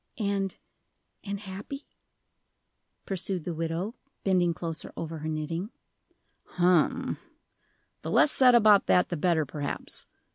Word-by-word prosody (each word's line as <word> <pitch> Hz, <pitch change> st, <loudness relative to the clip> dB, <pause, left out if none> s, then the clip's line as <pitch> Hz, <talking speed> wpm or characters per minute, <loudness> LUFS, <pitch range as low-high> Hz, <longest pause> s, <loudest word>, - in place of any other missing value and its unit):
"And 200 Hz, -3 st, -1 dB, 0.7 s
and 200 Hz, -1 st, -4 dB
happy?" 205 Hz, +8 st, -7 dB, 1.2 s
pursued 190 Hz, -2 st, -2 dB
the 175 Hz, -, -3 dB
widow, 165 Hz, +6 st, -2 dB, 0.3 s
bending 180 Hz, -3 st, +3 dB
closer 165 Hz, -1 st, -5 dB
over 165 Hz, -1 st, -5 dB
her 155 Hz, -, -5 dB
knitting. 165 Hz, +5 st, -3 dB, 0.9 s
"Hum 180 Hz, -2 st, +2 dB, 0.8 s
the -, -, -5 dB
less 300 Hz, -, +5 dB
said 250 Hz, -2 st, +6 dB
about 210 Hz, -3 st, +6 dB
that 180 Hz, -, +4 dB
the 175 Hz, -, -2 dB
better, 160 Hz, -1 st, +2 dB
perhaps. 145 Hz, +1 st, -5 dB
180 Hz, 115 wpm, -28 LUFS, 165-200 Hz, 1.2 s, said